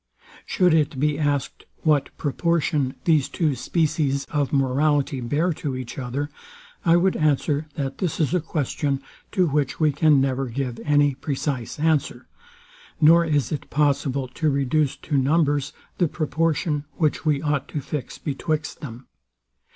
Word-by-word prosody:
Should 180 -4 +3
it 150 -4 +1
be 150 +1 +1
asked, 145 -3 -1 0.2
what 150 -3 +2
proportion 150 -2 0
these 155 -5 +3
two 155 -5 0
species 145 0 0
of 145 -3 0
morality 140 0 +1
bear 150 +9 0
to 145 -3 -4
each 130 +1 -6
other? 140 +4 -3 0.5
I 165 0 +5
would 185 +2 +2
answer, 150 0 +1
that 135 -2 -4
this 180 -5 -2
is 155 0 +1
a 180 - +2
question, 145 -2 -2 0.3
to 185 - +2
which 145 -3 -1
we 155 -2 +4
can 145 0 +4
never 135 0 0
give 125 0 -4
any 145 -1 +3
precise 135 -3 -3
answer; 145 -5 0 0.7
nor 165 +2 +6
is 145 -7 0
it 150 - -4
possible 140 -2 +1
to 155 +4 0
reduce 140 +1 +1
to 145 -3 -1
numbers 145 0 +1 0.3
the 175 - +4
proportion, 155 -1 -1
which 150 -1 0
we 150 -3 +2
ought 145 -2 -1
to 150 - -4
fix 140 -2 -5
betwixt 155 +2 -3
them. 125 -4 -8
145 Hz, 150 wpm, -23 LUFS, 135-155 Hz, 0.7 s, nor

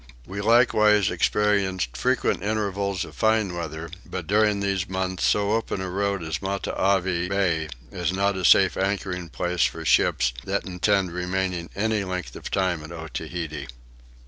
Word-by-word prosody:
We 100 +2 -5
likewise 105 -2 +4
experienced 95 -6 +1
frequent 65 - +1
intervals 100 -2 -1
of - - -12
fine 110 -4 +2
weather; 80 -1 -5
but 90 -3 -6
during 105 +2 +3
these 100 -2 -1
months 95 -1 -2
so 100 0 +2
open 110 -3 -1
a 95 -1 -4
road 100 -1 -1
as 80 -1 -3
Matavai 95 -2 0
bay 85 -6 0 0.2
is 90 -3 -1
not 100 +1 +1
a 95 - -4
safe 95 +1 +6
anchoring 95 -3 -2
place 90 +1 -1
for 80 0 -4
ships - - +3
that - - -2
intend 95 0 +1
remaining 90 0 -2
any 110 0 0
length 90 -1 -5
of - - -7
time 90 -5 0
at 75 - -9
Otaheite. 80 -1 -5
95 Hz, 150 wpm, -25 LUFS, 85-100 Hz, 0.2 s, safe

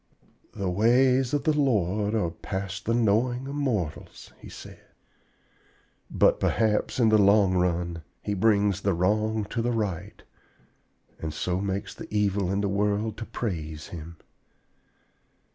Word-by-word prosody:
"The 100 - -3
ways 125 +6 +3
of 145 - 0
the 155 - +2
Lord 105 - +1
are 90 -7 0
past 95 +2 -5
the 115 - +1
knowing 120 +3 +1
of 140 - -5
mortals," 115 - -3
he - - -11
said. - - -11 1.3
"But - - +3
perhaps 110 +2 +1
in 115 -2 +5
the 110 0 +5
long 100 -1 +5
run 85 -2 0 0.2
He 105 - -2
brings 100 -1 +2
the 100 -2 +1
wrong 105 +4 +1
to 120 - -1
the 120 - 0
right, 105 -8 -3 1.0
and 80 - -4
so 90 +4 -2
makes 100 0 -3
the - - -11
evil 100 -3 0
in 100 +1 0
the 100 - 0
world 105 +2 0
to 115 - -5
praise 80 -10 -5
him. 85 0 -9
100 Hz, 145 wpm, -26 LUFS, 90-115 Hz, 1.3 s, in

